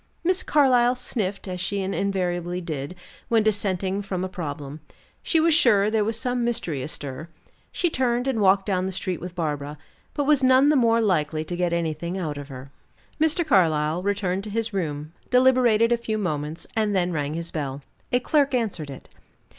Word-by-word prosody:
Miss 365 +2 +2
Carlyle 255 -4 +3
sniffed, 205 -6 -3
as 180 -1 -4
she 200 +2 -1
invariably 180 -2 -1
did, 155 -2 -5 0.3
when 225 -2 +3
dissenting 195 -2 0
from 190 -2 -3
a - - -1
problem. 145 -5 -6 0.4
She 325 - +2
was 325 +1 +4
sure 215 -10 +4
there 220 -1 +2
was 225 +2 0
some 245 0 -1
mystery 230 - -2
astir. 145 +2 -6 0.4
She 350 - 0
turned 245 -1 0
and 245 -5 0
walked 195 0 +4
down 185 -2 0
the - - -3
street 185 -2 -3
with 180 0 -7
Barbara, 150 -3 -3 0.4
but 290 - 0
she - - -5
was 295 -3 +4
none 260 +2 +5
the 305 - +4
more 230 -3 +3
likely 155 -7 0
to 175 - -4
get 175 -1 0
anything 170 +1 -2
out 155 -6 -3
of 140 - -8
her. 135 0 -10 0.5
Mr. 320 +2 +2
Carlyle 165 - +2
returned 195 -1 -1
to - - -6
his 225 +1 -2
room, 155 -4 -3 0.2
deliberated 250 -3 +4
a 240 - +4
few 220 -2 -3
moments, 155 -5 -3
and 215 -2 +1
then 180 -1 +1
rang 145 -1 -2
his 170 0 -5
bell. 140 -2 -4 0.3
A 245 - +3
clerk 280 0 +2
answered 205 -11 -2
it. 135 - -10
190 Hz, 185 wpm, -24 LUFS, 160-235 Hz, 0.5 s, none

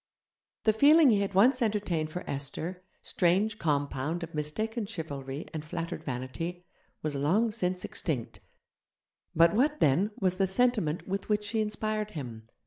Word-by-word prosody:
The 220 - +4
feeling 290 +4 +6
he 205 -2 +3
had 195 -1 -2
once 250 +7 +5
entertained 205 -8 0
for 180 +3 -5
Esther, 160 +6 -4 0.2
strange 200 +5 +1
compound 145 +1 -1
of 165 - -7
mistaken 210 +9 -3
chivalry 145 -8 -5
and 155 -2 -4
flattered 165 +2 -5
vanity, 165 +8 -5 0.4
was 155 -1 -1
long 185 +12 +2
since 185 -4 -1
extinct; 130 -9 -4 1.0
but 170 +3 +6
what, 295 +7 +2
then, 155 +9 +3
was 185 -2 +1
the 195 0 +2
sentiment 200 -6 +1
with 195 +2 -3
which 210 0 +1
she 220 +1 0
inspired 215 0 -2
him? 115 -5 -7
180 Hz, 145 wpm, -29 LUFS, 150-215 Hz, 1.0 s, feeling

